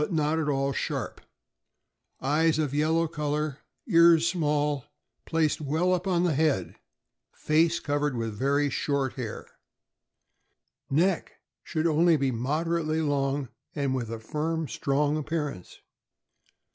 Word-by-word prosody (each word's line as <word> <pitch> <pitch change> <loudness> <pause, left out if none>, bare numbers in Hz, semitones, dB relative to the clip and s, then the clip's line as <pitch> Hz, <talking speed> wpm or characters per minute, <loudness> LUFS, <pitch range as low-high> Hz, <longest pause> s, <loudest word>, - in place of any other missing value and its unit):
not 160 -2 +1
at 150 -2 -1
all 135 -1 0
sharp; - - -3 1.0
eyes 155 +4 +2
of 150 -3 -1
yellow 160 +3 +2
color; 150 -2 -2 0.3
ears 170 -1 +6
small, 150 -5 0 0.4
placed 160 -2 +1
well 160 +6 +1
up 180 +1 -1
on 175 -2 +2
the 175 -3 +2
head; 135 - +1 0.6
face 160 +2 +2
covered 145 -2 -1
with 115 -2 -2
very 140 +5 +1
short 140 -1 -1
hair. 120 -5 -6 1.4
Neck. 170 +5 +1 0.2
— - - -64
Should 160 -2 -2
be 170 - +3
only 155 -4 +3
moderately 155 +6 -1
long 140 -2 0 0.3
and 140 -2 0
with 120 -4 -3
a 115 - -4
firm, 155 +7 -2
strong 145 +3 0
appearance. 150 - -4
150 Hz, 125 wpm, -27 LUFS, 140-160 Hz, 1.4 s, ears